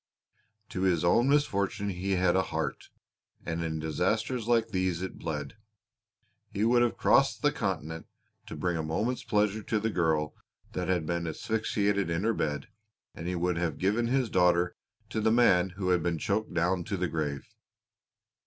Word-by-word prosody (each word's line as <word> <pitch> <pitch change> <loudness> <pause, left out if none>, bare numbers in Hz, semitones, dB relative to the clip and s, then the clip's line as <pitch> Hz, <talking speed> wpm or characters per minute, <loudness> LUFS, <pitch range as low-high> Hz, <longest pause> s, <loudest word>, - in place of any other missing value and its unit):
To 95 - -4
his 90 -4 +2
own 120 +9 +4
misfortune 100 -8 +1
he 95 +1 -2
had 90 -1 +2
a 95 - +4
heart, 95 - -4 0.6
and 80 0 -2
in 80 -1 -2
disasters 105 - -1
like 115 -1 +3
these 95 -4 0
it 95 - -6
bled. 75 +1 -4 0.9
He 100 +2 -1
would 120 +1 +4
have 120 -1 +1
crossed - - +3
the - - +4
Continent 80 +2 -3 0.4
to - - -6
bring 90 -2 -1
a - - -1
moment's 105 +11 -1
pleasure 105 0 +1
to 110 +1 -1
the 110 +1 -1
girl 80 -4 +1 0.4
that - - -3
had 90 -4 +1
been 85 +1 -2
asphyxiated 100 +2 0
in 85 +3 -1
her 115 +1 +2
bed, 75 -7 -2 0.5
and 85 - -7
he 90 - -1
would 90 0 0
have 85 -3 -1
given 105 +5 +1
his 130 -2 +1
daughter 90 -1 +3 0.4
to 110 - -1
the 110 +1 +3
man 95 -6 +4
who 95 -2 -1
had 90 -1 +3
been 85 0 0
choked 105 +6 -1
down 90 +1 +1
to 100 - -2
the 90 0 0
grave. 75 -3 -3
95 Hz, 175 wpm, -29 LUFS, 85-110 Hz, 0.9 s, own